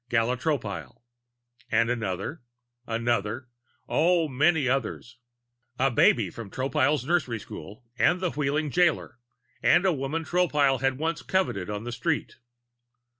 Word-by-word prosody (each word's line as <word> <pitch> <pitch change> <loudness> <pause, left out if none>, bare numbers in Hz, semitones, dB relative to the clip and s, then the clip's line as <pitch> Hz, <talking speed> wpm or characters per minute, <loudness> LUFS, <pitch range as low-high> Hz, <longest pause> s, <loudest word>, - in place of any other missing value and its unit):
(Gala 120 0 +2
Tropile.) 140 -4 -3 0.7
And 115 +1 +2
another, 110 - -3 0.5
another 115 +1 -1 0.4
oh, 170 +1 +3
many 150 +1 +2
others 125 -1 -2 0.6
a 135 +1 +2
babe 110 -4 +3
from 115 -4 -8
Tropile's 135 +2 0
nursery 150 -7 +1
school 105 +2 -10 0.2
and 180 - +4
the 180 -2 -1
Wheeling 150 +1 -1
jailer 160 -7 +1 0.4
and 175 +2 +4
a 185 - +4
woman 150 +3 -3
Tropile 150 -7 +2 0.2
once 160 +2 -1
had - - -16
coveted 175 - 0
on 105 0 -4
the 120 - -5
street. 120 0 -2
135 Hz, 125 wpm, -27 LUFS, 115-160 Hz, 0.7 s, and